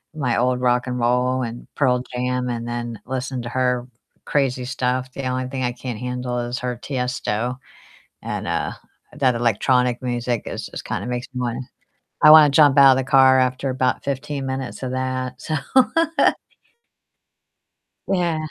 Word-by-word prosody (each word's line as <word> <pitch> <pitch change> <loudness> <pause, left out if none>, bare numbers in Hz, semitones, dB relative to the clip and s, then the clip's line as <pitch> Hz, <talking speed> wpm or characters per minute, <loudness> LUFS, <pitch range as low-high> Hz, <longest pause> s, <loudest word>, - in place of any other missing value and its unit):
my 135 -6 0
old 125 +1 +1
rock 125 0 +1
and 125 0 -2
roll 125 +2 +1
and 120 0 -7
Pearl 125 -3 +2
Jam, 125 0 -1
and 120 -1 -4
then 120 -2 -4
listen 130 0 -3
to 120 - -5
her 125 0 0 0.4
crazy 130 -3 0
stuff. 130 0 -2
The 135 - -5
only 130 0 -2
thing 130 0 -4
I 125 - 0
can't 120 -2 -6
handle 125 0 -3
is 120 +1 -3
her 125 -1 -3
Tiesto 125 -2 -2 0.7
and, - - -4
uh, - - -1 0.5
that 130 -3 +2
electronic 120 +2 +1
music. 120 -2 -2
It - - -5
just - - -7
kind - - -3
of - - -5
makes 125 +1 -3
me 125 - -3
wanna 120 0 -2 0.7
I 150 - +10
wanna 155 -1 +9
jump 145 -1 +5
out 135 -1 +9
of - - +3
the 135 - -1
car 130 -1 +6
after 130 +2 0
about 130 0 0
15 140 0 -3
minutes 130 0 -5
of 130 - -3
that, 130 0 -3
so 155 - -2 2.5
Yeah. 175 -4 +1
125 Hz, 165 wpm, -22 LUFS, 125-130 Hz, 2.5 s, I